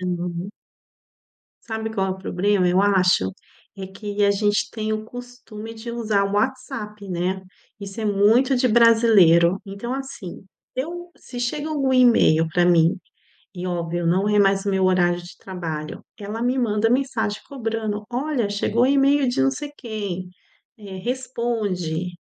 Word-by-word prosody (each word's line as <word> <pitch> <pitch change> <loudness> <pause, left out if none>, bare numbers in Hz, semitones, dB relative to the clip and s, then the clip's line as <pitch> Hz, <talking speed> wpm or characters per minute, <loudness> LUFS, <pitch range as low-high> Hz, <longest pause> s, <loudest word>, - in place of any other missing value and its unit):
Então 180 0 -3 1.2
Sabe 220 0 -4
qual 195 -2 0
é - - -2
o 190 - -5
problema 190 0 +1
eu 180 +2 +3
acho? 185 - +3 0.5
É 190 - -5
que 205 +1 -3
a 200 - +5
gente 205 +1 +1
tem 220 -1 -3
o 215 0 -4
costume 240 -2 -9
de 230 +1 -7
usar 220 -4 0
o 200 0 -2
WhatsApp, 225 -4 -3
né? 180 +2 -2 0.4
Isso 200 +2 -7
é 215 - -2
muito 220 +6 +3
de 250 0 +2
brasileiro. 215 -7 +5
Então 200 +6 -5
assim, 265 -10 -7 0.3
eu 345 +6 -5
se 245 - -9
chega 290 +6 -2
algum 275 -4 0
e-mail 230 -10 +5
pra 175 +2 +2
mim, 170 +1 +4 0.6
e 180 0 -5
óbvio, 175 -1 -2
não 190 +4 +2
é 210 0 +3
mais 195 0 +3
o 200 - 0
meu 190 -1 +1
horário 175 -1 +2
de 175 - -12
trabalho, 160 -5 -6 0.2
ela 210 +2 -6
me 250 +2 +1
manda 220 -2 +1
mensagem 240 -5 0
cobrando: 225 -5 -3
"Olha, 250 -2 -1
chegou 205 +3 0
o 255 - +5
e-mail 275 0 +3
de 245 - +1
não 135 - +3
sei 295 - -6
quem. 200 -6 -5 0.5
Eh, 200 -3 -9
responde". 210 -8 -2
210 Hz, 160 wpm, -22 LUFS, 185-240 Hz, 1.2 s, a